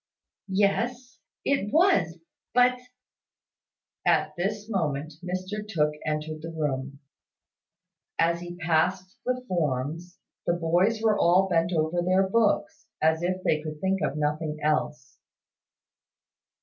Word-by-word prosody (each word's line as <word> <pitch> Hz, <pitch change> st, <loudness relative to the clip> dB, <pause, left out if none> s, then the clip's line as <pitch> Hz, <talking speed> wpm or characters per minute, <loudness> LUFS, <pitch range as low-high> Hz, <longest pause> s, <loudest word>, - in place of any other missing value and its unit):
"Yes, 225 Hz, +6 st, 0 dB, 0.3 s
it 240 Hz, -8 st, +1 dB
was 320 Hz, -, +3 dB, 0.4 s
but 250 Hz, 0 st, +5 dB, 0.7 s
" -, -, -61 dB
At -, -, -6 dB
this 205 Hz, +4 st, -2 dB
moment 155 Hz, -7 st, -2 dB
Mr 185 Hz, +3 st, -3 dB
Tooke 150 Hz, -6 st, +1 dB
entered 155 Hz, 0 st, -3 dB
the 165 Hz, -, -6 dB
room. 140 Hz, -3 st, -3 dB, 1.2 s
As 170 Hz, +1 st, +2 dB
he 175 Hz, 0 st, -7 dB
passed 180 Hz, +3 st, 0 dB
the 255 Hz, 0 st, -1 dB
forms, 165 Hz, +1 st, -2 dB, 0.3 s
the 170 Hz, -, +3 dB
boys 175 Hz, +7 st, +1 dB
were 215 Hz, -2 st, +3 dB
all 180 Hz, +3 st, +4 dB
bent 170 Hz, -1 st, +1 dB
over 165 Hz, +1 st, +1 dB
their 185 Hz, +2 st, +3 dB
books, 230 Hz, +10 st, +1 dB
as 160 Hz, +1 st, +2 dB
if 185 Hz, +1 st, -1 dB
they 155 Hz, -, +2 dB
could 155 Hz, -1 st, -6 dB
think 190 Hz, +2 st, 0 dB
of -, -, -1 dB
nothing 150 Hz, +1 st, -1 dB
else. 150 Hz, -3 st, -1 dB
175 Hz, 125 wpm, -27 LUFS, 155-200 Hz, 1.2 s, but